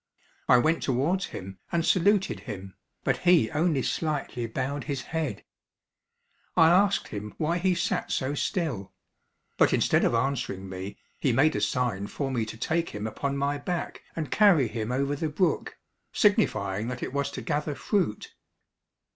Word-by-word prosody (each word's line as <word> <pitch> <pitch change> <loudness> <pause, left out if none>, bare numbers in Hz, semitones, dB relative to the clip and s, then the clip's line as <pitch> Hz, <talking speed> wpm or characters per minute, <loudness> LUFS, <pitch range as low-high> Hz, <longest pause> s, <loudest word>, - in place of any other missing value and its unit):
I 125 - +8
went 160 +7 +2
towards 150 +9 +1
him 95 +1 -8
and 170 -1 +1
saluted 195 +2 +3
him, 95 -1 -7 0.3
but - - +1
he 175 -11 +4
only 155 -4 +1
slightly 150 -6 -2
bowed 135 +5 -3
his 140 -3 -3
head. 160 -5 -2 1.1
I 165 0 +7
asked 195 +3 +3
him 105 0 -6
why 165 +3 0
he 185 0 +2
sat 170 - -1
so 130 +1 0
still; 145 - -2 0.7
but - - +5
instead - - +3
of 120 - +2
answering 115 -6 -1
me, 95 +1 -6 0.2
he 135 - +2
made 140 +6 +3
a - - -1
sign 120 -8 0
for 135 +4 -3
me 115 -4 -1
to 110 - -7
take 165 +8 0
him 105 +1 -5
upon 140 +5 -2
my 140 +1 0
back 175 +4 -4
and 155 -3 -4
carry 190 - +5
him 110 0 -3
over 140 +3 0
the 155 +2 -2
brook, 170 +5 0 0.3
signifying 110 - +2
that 125 0 -4
it - - -4
was 140 0 0
to - - -5
gather 150 -2 -1
fruit. 180 - -1
140 Hz, 165 wpm, -27 LUFS, 115-165 Hz, 1.1 s, I